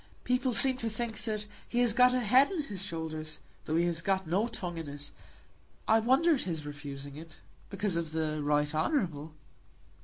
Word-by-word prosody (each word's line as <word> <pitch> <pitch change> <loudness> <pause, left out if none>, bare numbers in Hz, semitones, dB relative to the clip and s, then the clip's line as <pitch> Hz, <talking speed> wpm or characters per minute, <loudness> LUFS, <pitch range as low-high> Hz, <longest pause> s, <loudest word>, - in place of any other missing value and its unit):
"People 250 +1 +1
seem 255 +4 +5
to 230 -3 -2
think 220 -1 -3
that 215 -2 -2 0.2
he 240 - -3
has 240 -3 +4
got 250 +2 +6
a 255 0 +1
head 255 +5 +5
on 340 -6 -1
his 205 -9 -6
shoulders, 160 -4 -5 0.3
though 155 - -1
he 170 +1 +3
has 170 -1 0
got 190 +1 0
no 190 +8 +1
tongue 180 -7 -5
in 160 -3 -6
it. 145 0 -6 0.8
I 220 +1 +5
wonder 265 +9 +4
at 275 - 0
his 160 -5 -4
refusing 145 -1 -7
it 160 0 -11 0.3
because 200 -2 -1
of 165 -2 -2
the 155 -1 -1
Right 145 0 +1
Honourable." 155 - -1
185 Hz, 190 wpm, -31 LUFS, 155-235 Hz, 0.8 s, got